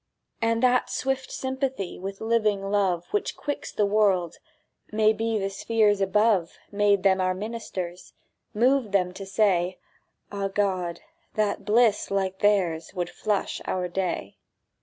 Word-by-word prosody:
And 230 +1 +1
that 250 0 +3
swift 265 0 -2
sympathy 265 -7 -3
With 195 +1 -6
living 215 -3 +1
love 185 -4 +1
Which 415 0 -1
quicks 290 - -4
the 210 - +1
world—maybe 215 +3 0
The 195 -1 -2
spheres 210 -1 +2
above, 195 -2 +2
Made 200 -1 +2
them 190 -1 +4
our 185 0 +1
ministers, 185 -4 -6 0.4
Moved 245 -1 +2
them 180 -2 +2
to 195 +1 -8
say, 190 -3 +2 0.5
"Ah, 200 -1 -2
God, 185 -4 -1 0.3
that 210 -2 0
bliss 220 0 +3
like 190 -1 -1
theirs 185 -5 +1
Would 175 -1 -2
flush 210 -2 -2
our 180 -1 -1
day!" 175 - -3
200 Hz, 130 wpm, -26 LUFS, 185-220 Hz, 0.5 s, them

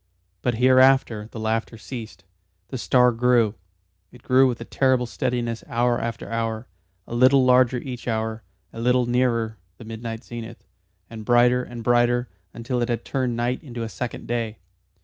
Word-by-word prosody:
But 120 -2 0
hereafter 130 -3 +4
the 115 - -7
laughter 110 +1 -2
ceased. 110 -4 -9 0.5
The 130 - -5
star 125 0 +4
grew 120 -2 +2 0.6
it 125 0 -17
grew 130 +1 +5
with 120 -2 -2
a 115 - -7
terrible 130 -1 +1
steadiness 120 -1 -2
hour 120 +1 +1
after 115 0 -4
hour, 115 0 -3 0.4
a - - -9
little 130 +2 +5
larger 125 0 +4
each 125 -1 -7
hour, 110 -1 -2 0.3
a - - -8
little 125 +1 +3
nearer 120 -2 0 0.2
the 115 - -12
midnight 115 +1 -6
zenith, 120 -1 -9 0.4
and 110 -1 -9
brighter 120 +2 +4
and 120 -2 -8
brighter, 120 0 +2 0.2
until 120 +3 -3
it 120 - -1
had 120 - -2
turned 130 -3 -1
night 120 +2 -1
into 120 -6 -6
a 115 - -4
second 125 +1 -6
day. 115 -2 -3
120 Hz, 165 wpm, -23 LUFS, 115-125 Hz, 0.6 s, grew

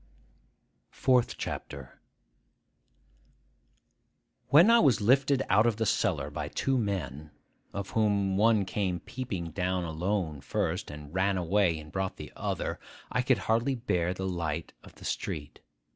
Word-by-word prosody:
FOURTH 125 -2 +2
CHAPTER 70 -3 -6 2.5
WHEN 170 +10 +7
I 235 - +7
was 130 - +4
lifted 135 +5 +3
out 105 +5 +4
of 115 - +2
the 110 +1 -1
cellar - - 0
by - - -4
two 135 - 0
men, 80 - -3 0.4
of 100 -1 -5
whom 100 -3 +2
one 105 0 +4
came 95 -2 -1
peeping 95 -10 -5
down 90 +1 -1
alone 80 -2 -2
first, - - -2
and 75 0 -9
ran 95 +1 +1
away 90 -1 +2
and 75 0 -10
brought 95 -1 -2
the - - -9
other, - - -3 0.3
I - - +1
could - - +3
hardly 115 +4 +2
bear 90 -8 0
the 95 - -4
light 85 -3 -3
of - - -15
the - - -12
street. 75 0 -4
95 Hz, 140 wpm, -29 LUFS, 85-115 Hz, 2.5 s, WHEN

